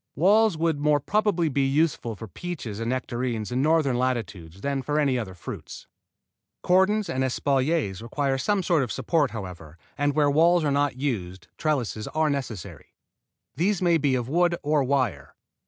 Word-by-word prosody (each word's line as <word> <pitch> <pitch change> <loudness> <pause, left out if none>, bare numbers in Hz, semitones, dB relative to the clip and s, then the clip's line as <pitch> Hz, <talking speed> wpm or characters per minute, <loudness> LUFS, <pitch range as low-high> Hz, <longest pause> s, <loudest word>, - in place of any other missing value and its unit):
Walls 205 +3 +4
would 160 -2 0
more 150 0 +3
probably 200 0 +1
be 140 -1 0
useful 140 -5 0
for 110 +2 -9
peaches 120 - -6
and 115 0 -2
nectarines 120 -3 -2
in 125 +1 0
northern 150 -4 +2
latitudes 100 -9 -3
than 140 -1 -1
for 150 +3 -1
any 135 -4 +2
other 95 -6 -6
fruits. 90 - -8 0.8
Cordons 190 +3 +3
and 130 -5 -1
espaliers 135 - 0
require 135 +3 -1
some 195 +7 0
sort 170 -4 +2
of 125 - -2
support, 155 -5 +1
however, 90 -7 -8 0.2
and 145 0 +1
where 145 -2 +3
walls 170 +3 +4
are 145 - +1
not 145 -1 +1
used 95 -10 -4
trellises 125 -8 -2
are 155 -1 +2
necessary. 125 -9 -6 0.6
These 185 +6 +1
may 170 -3 +3
be 140 -3 +2
of 120 -2 -2
wood 175 +4 +2
or 150 -1 +2
wire. 125 - -1
140 Hz, 165 wpm, -25 LUFS, 120-160 Hz, 0.8 s, Walls